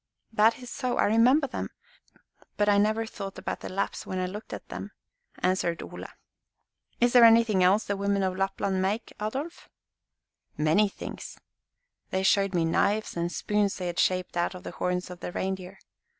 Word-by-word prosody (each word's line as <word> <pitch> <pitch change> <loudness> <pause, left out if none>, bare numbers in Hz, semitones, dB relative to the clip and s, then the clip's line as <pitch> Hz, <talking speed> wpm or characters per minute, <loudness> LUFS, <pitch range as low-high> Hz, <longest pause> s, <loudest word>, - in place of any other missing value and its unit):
"That 220 +1 +4
is 250 -1 -10
so, 255 -2 -2
I - - +3
remember 245 +7 +4
them; 265 - -4 0.9
but 205 - +2
I 205 -1 +5
never 215 +2 +2
thought 195 -3 -7
about - - -4
the - - -7
Lapps 195 +1 -2
when 185 - -5
I 185 - 0
looked 205 +4 -7
at - - -7
them," - - -7 0.4
answered 180 -2 0
Ole. - - -8 0.9
"Is 240 0 +3
there 245 -1 +8
anything 225 -4 +6
else 195 +4 +4
the 200 - -2
women 200 0 0
of 185 -1 0
Lapland 195 0 -1
make, 205 +5 -2
Adolf?" 270 +11 -4 0.9
"Many 160 +8 +3
things. - - -8 0.7
They 190 0 -1
showed 195 -1 +3
me 170 -1 +2
knives 205 +6 +1
and 170 0 -1
spoons 205 0 0
they 185 - -5
had 175 0 -3
shaped 185 -1 +1
out 175 +2 0
of 180 - -10
the - - -6
horns 180 0 -2
of 180 - -9
the - - -5
reindeer. 190 0 -4
195 Hz, 180 wpm, -27 LUFS, 185-220 Hz, 0.9 s, there